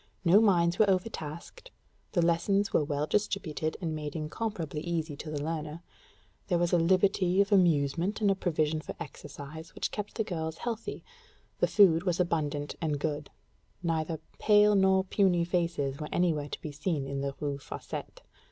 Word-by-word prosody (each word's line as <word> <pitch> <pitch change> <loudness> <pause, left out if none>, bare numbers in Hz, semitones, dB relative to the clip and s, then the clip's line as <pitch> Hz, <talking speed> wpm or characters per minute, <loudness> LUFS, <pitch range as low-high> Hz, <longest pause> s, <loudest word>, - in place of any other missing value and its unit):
No 185 +5 +7
minds 175 -5 +3
were 215 -2 +5
overtasked; 185 - -3 0.4
the 175 -4 +3
lessons 195 +4 +1
were - - +4
well 145 0 -1
distributed 165 -5 -1
and 165 -4 -2
made 150 -2 -5
incomparably 160 -1 -3
easy 165 -3 -2
to 155 - -7
the 145 -1 -3
learner; 155 +1 -4 0.6
there 175 - +2
was 175 0 +1
a 175 - +5
liberty 185 +1 +3
of 200 0 +3
amusement 170 0 +3
and 205 -2 +3
a - - +2
provision 155 -4 0
for - - -7
exercise 155 0 -9
which - - -2
kept 210 -1 -5
the 220 - 0
girls 160 -4 -4
healthy; 230 -2 -4 0.6
the - - +3
food 180 -6 +5
was 180 -1 -1
abundant 150 -4 -1
and 155 -3 0
good: 150 -1 -3 0.5
neither 160 -1 -1 0.2
pale 210 0 +5
nor 190 -1 +4
puny 185 -3 +2
faces 170 -6 -1
were 150 - -5
anywhere 155 -5 +1
to - - -6
be 155 - -4
seen 145 -1 -2
in 135 0 -3
the 140 0 -3
Rue 140 -1 -2
Fossette. - - -7
170 Hz, 170 wpm, -30 LUFS, 150-190 Hz, 0.6 s, No